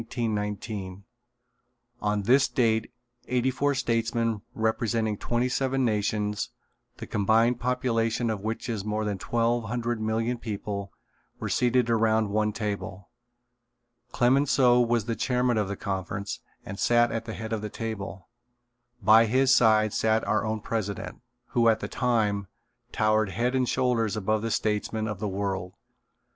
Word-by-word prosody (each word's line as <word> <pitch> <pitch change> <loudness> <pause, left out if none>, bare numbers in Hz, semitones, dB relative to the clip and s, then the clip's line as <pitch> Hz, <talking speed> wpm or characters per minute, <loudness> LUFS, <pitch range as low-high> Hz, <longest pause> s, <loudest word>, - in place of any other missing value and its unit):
On 105 -1 0
this 130 +6 +4
date 110 -2 +1 0.4
eighty 125 +1 +1
four 140 +2 0
statesmen 115 -3 0
representing 110 0 0
twenty 120 +4 -1
seven 135 0 0
nations, 105 -1 -1 0.5
the - - -7
combined 115 +4 +2
population 120 -2 0
of 105 -3 -4
which 110 +1 -3
is 110 -5 -3
more 105 +1 -2
than 100 -2 -2
twelve 120 +1 0
hundred 120 0 -2
million 115 +2 -1
people, 100 -3 -5 0.5
were - - -3
seated 125 -1 +2
around 110 -2 +2
one 105 +1 +1
table. 100 -3 -5 1.0
Clemenceau 125 -1 +4
was 120 -2 +1
the 115 -1 -2
chairman 125 -2 +1
of 105 - 0
the 100 0 -4
conference 95 +1 -4 0.3
and 100 - -7
sat 120 0 +3
at 115 0 -3
the 110 - -5
head 110 0 -5
of 110 - -2
the 105 - -4
table. 100 -5 -6 0.8
By 110 +3 +7
his 130 +3 +4
side 110 -3 +4
sat 110 0 +2
our 110 - +1
own 110 -1 -2
president, 100 -4 -4 0.3
who 115 -1 +3
at 110 - +2
that - - -6
time, 105 -5 0 0.4
towered 110 -1 +2
head 120 +5 -1
and 130 -2 +1
shoulders 120 -4 +1
above 110 +1 0
the 115 - -2
statesmen 110 0 -1
of 105 -3 -4
the 105 - -2
world. 95 -2 -3
110 Hz, 145 wpm, -27 LUFS, 105-120 Hz, 1.0 s, By